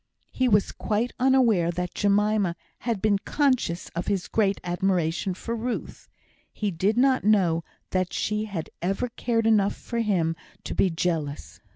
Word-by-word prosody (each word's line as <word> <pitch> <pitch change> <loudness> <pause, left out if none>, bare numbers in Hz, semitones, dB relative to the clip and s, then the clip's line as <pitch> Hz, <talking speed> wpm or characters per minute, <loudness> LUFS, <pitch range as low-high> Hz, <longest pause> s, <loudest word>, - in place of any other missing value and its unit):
He 255 - +1
was 205 -2 +3
quite 225 +3 -1
unaware 245 -9 +4
that 180 +1 -3
Jemima 205 -2 +2 0.2
had 230 -5 -2
been 205 -2 +3
conscious 255 - 0
of 170 - -5
his 195 -3 -1
great 200 -3 +1
admiration 180 0 0
for 230 +5 -4
Ruth; 235 +2 -5 0.4
he 210 -2 -2
did 195 +6 0
not 260 +1 +3
know 180 -6 +3 0.3
that 185 -1 0
she 210 +1 -1
had 190 -7 -5
ever 195 +8 -1
cared 230 -1 -1
enough 210 -3 +3
for 235 - -5
him 180 -7 +1 0.3
to - - -4
be 190 - +3
jealous. 160 -4 -3
200 Hz, 155 wpm, -26 LUFS, 175-225 Hz, 0.4 s, unaware